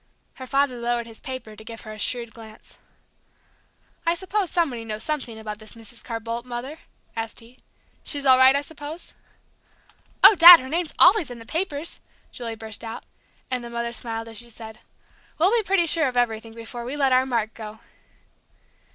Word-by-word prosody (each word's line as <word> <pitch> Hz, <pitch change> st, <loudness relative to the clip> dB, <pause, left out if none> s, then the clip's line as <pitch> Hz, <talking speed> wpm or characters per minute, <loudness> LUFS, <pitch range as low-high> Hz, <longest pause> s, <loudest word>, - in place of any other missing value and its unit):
Her 260 Hz, -, -8 dB
father 275 Hz, -1 st, +1 dB
lowered 235 Hz, 0 st, -1 dB
his 225 Hz, -1 st, -13 dB
paper 255 Hz, -5 st, -7 dB
to 220 Hz, -, -13 dB
give 225 Hz, 0 st, -9 dB
her 215 Hz, -, -9 dB
a 215 Hz, -, -11 dB
shrewd 235 Hz, +1 st, -2 dB
glance. 220 Hz, -1 st, -14 dB, 1.2 s
"I 335 Hz, 0 st, +1 dB
suppose 375 Hz, +1 st, -2 dB
somebody 280 Hz, -10 st, -1 dB
knows 215 Hz, -1 st, -6 dB
something 270 Hz, -7 st, -3 dB
about 210 Hz, -1 st, -7 dB
this 215 Hz, +1 st, -13 dB
Mrs. 230 Hz, +1 st, -11 dB
Carr 230 Hz, -2 st, -5 dB
Boldt, 230 Hz, +1 st, -5 dB
Mother?" 250 Hz, +5 st, -7 dB, 0.4 s
asked 225 Hz, 0 st, -4 dB
he. 235 Hz, +2 st, -17 dB, 0.4 s
"She's 285 Hz, -2 st, -3 dB
all 260 Hz, -1 st, +7 dB
right, 260 Hz, +1 st, +7 dB
I 280 Hz, -, +1 dB
suppose?" 300 Hz, +2 st, -10 dB, 1.1 s
"Oh, 395 Hz, +3 st, +11 dB
Dad, 345 Hz, -2 st, +11 dB
her 260 Hz, -, -8 dB
name's 330 Hz, +1 st, -2 dB
always 360 Hz, -3 st, +6 dB
in 245 Hz, -, -8 dB
the 230 Hz, -, -12 dB
papers," 320 Hz, +1 st, -3 dB, 0.3 s
Julie 230 Hz, -2 st, -6 dB
burst 220 Hz, 0 st, -7 dB
out; 225 Hz, 0 st, -7 dB, 0.5 s
and 250 Hz, -1 st, -1 dB
the 235 Hz, -, -8 dB
mother 235 Hz, 0 st, -4 dB
smiled 225 Hz, -1 st, -5 dB
as 225 Hz, -1 st, -7 dB
she 240 Hz, 0 st, -7 dB
said, 220 Hz, -1 st, -10 dB, 0.6 s
"We'll 355 Hz, +5 st, +3 dB
be 465 Hz, -, +4 dB
pretty 390 Hz, -4 st, +1 dB
sure 320 Hz, -2 st, +3 dB
of 250 Hz, -1 st, -4 dB
everything 225 Hz, -2 st, -1 dB
before 230 Hz, +1 st, -8 dB
we 255 Hz, +4 st, -5 dB
let 275 Hz, -3 st, +2 dB
our 255 Hz, +1 st, +3 dB
Mark 230 Hz, -4 st, -1 dB
go!" 215 Hz, -1 st, -9 dB
240 Hz, 185 wpm, -24 LUFS, 225-290 Hz, 1.2 s, Oh